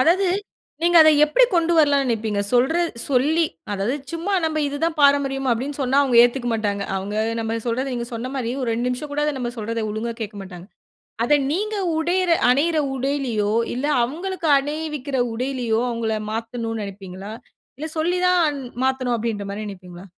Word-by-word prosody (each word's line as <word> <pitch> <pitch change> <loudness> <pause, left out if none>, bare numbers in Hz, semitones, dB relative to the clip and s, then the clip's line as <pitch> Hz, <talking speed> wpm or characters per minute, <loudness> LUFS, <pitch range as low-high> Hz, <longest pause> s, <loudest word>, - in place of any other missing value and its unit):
அதாவது, 350 +8 +4 0.6
நீங்க 345 0 +4
அத 315 - +7
எப்டி 305 +12 +4
கொண்டு 340 0 +2
வரலாம்னு 285 -3 +4
நினைப்பீங்க? 220 -3 -1
சொல்றது 320 +8 +2 0.2
சொல்லி 295 +6 +3 0.3
அதாவது 205 +6 -1 0.2
சும்மா 335 +5 -3
நம்ம 315 -1 0
இது 285 - -4
தான் 335 -1 -1
பாரம்பரியம் 275 -2 +3
அப்டின்னு 265 +5 -2
சொன்னா 265 +2 +2
அவங்க 255 -4 +1
ஏத்துக்க 245 0 0
மாட்டாங்க. 205 -2 -1
அவங்க 195 +2 -4 0.3
நம்ம 225 0 -2
சொல்றத 245 +3 -1
நீங்க 235 -1 -3
சொன்ன 235 +3 -4
மாரி, 245 -3 -2
ஒரு 240 - -1
2 240 +2 -1
நிமிஷம் 285 +4 -4
கூட 295 - 0
அத 300 - +1
நம்ம 240 -1 -3
சொல்றத 225 +1 -3
ஒழுங்கா 225 +2 -3
கேட்க 210 -1 -5
மாட்டாங்க. 180 -2 -10 0.6
அத 295 - +3 0.2
நீங்க 425 +6 -1 0.2
உடையற 350 +2 +1 0.2
அணியிற 310 +5 +2 0.2
உடையிலையோ 255 -6 -1 0.2
இல்ல, 255 +3 -2 0.2
அவங்ளுக்கு 345 +6 -4
அணிவிக்கிற 295 -2 -3
உடையிலையோ. 240 -2 -1
அவங்கள 225 -2 -1 0.2
மாத்தனும்னு 225 0 -4
நினைப்பீங்களா? 195 0 -8 0.5
இல்ல 315 - -3
சொல்லி 350 +3 +1
தான் 325 -6 +2 0.3
மாத்தனு 260 -2 0
அப்டின்ற 215 -3 -3
மாரி 210 +2 -5
நினைப்பீங்களா? 185 -2 -10
255 Hz, 165 wpm, -22 LUFS, 225-305 Hz, 0.6 s, அத